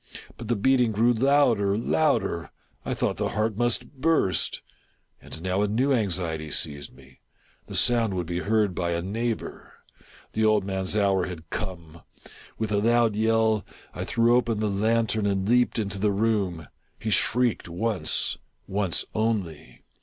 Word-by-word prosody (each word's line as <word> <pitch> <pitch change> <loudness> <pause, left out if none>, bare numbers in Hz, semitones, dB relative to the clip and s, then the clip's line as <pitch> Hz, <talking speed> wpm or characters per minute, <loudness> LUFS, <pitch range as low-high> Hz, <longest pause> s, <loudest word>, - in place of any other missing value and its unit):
But - - -9
the 120 - +1
beating 125 +2 +3
grew 115 +4 +3
louder, 120 -6 +3
louder! 115 - 0 0.3
I - - -3
thought - - -1
the - - -1
heart 110 0 0
must 120 +2 0
burst. 160 - +1 0.6
And 80 - -8
now 95 +1 0
a 105 - +2
new 125 +7 +1
anxiety 85 -8 -1
seized 70 -1 -3
me 65 0 -19 0.2
— - - -36
the - - -7
sound 115 -5 +3
would 90 -1 -2
be 85 +1 -3
heard 105 0 +1
by 85 -1 -1
a 85 0 -2
neighbor! 115 +4 -4 0.6
The 110 - 0
old 110 -2 +3
man's 95 +1 -1
hour 95 -3 +2
had 85 -3 -9
come! 85 -5 -6 0.6
With 110 -1 -3
a 105 - +2
loud 115 0 +3
yell, 110 -1 +2 0.3
I - - -4
threw 120 +1 +3
open 115 -3 +1
the 105 -1 0
lantern 110 +1 +1
and 95 -1 -1
leaped 125 +2 +3
into 100 -3 -2
the 105 +1 +2
room. 100 -5 -1 0.3
He 110 - -4
shrieked 120 -3 +1
once 90 -1 -1
— - - -46
once 95 -3 0
only. 105 -8 -3
105 Hz, 160 wpm, -25 LUFS, 95-115 Hz, 0.6 s, beating